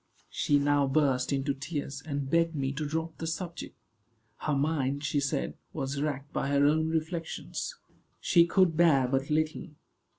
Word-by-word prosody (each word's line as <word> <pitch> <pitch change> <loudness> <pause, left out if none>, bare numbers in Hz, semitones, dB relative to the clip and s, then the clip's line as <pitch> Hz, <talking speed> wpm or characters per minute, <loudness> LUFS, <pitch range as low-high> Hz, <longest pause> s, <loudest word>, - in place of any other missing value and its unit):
She 145 - +2
now 145 0 +2
burst 135 -2 +2
into 140 0 0
tears, 140 0 -5
and 140 -2 -3
begged 165 +2 +2
me 135 -2 -1
to 150 +1 -3
drop 160 +2 -3
the 165 - -3
subject. 170 +1 -5 0.6
Her 150 - -1
mind, 140 -1 0
she 150 - +1
said, 135 - -1 0.2
was 135 +1 -3
racked 145 -1 -3
by - - -1
her 140 0 +3
own 160 +2 +3
reflections. 165 - -3 0.4
She 170 -2 +4
could 180 -2 +3
bear 155 -6 +4
but 135 +1 -1
little. 155 +2 0
145 Hz, 160 wpm, -29 LUFS, 140-160 Hz, 0.6 s, She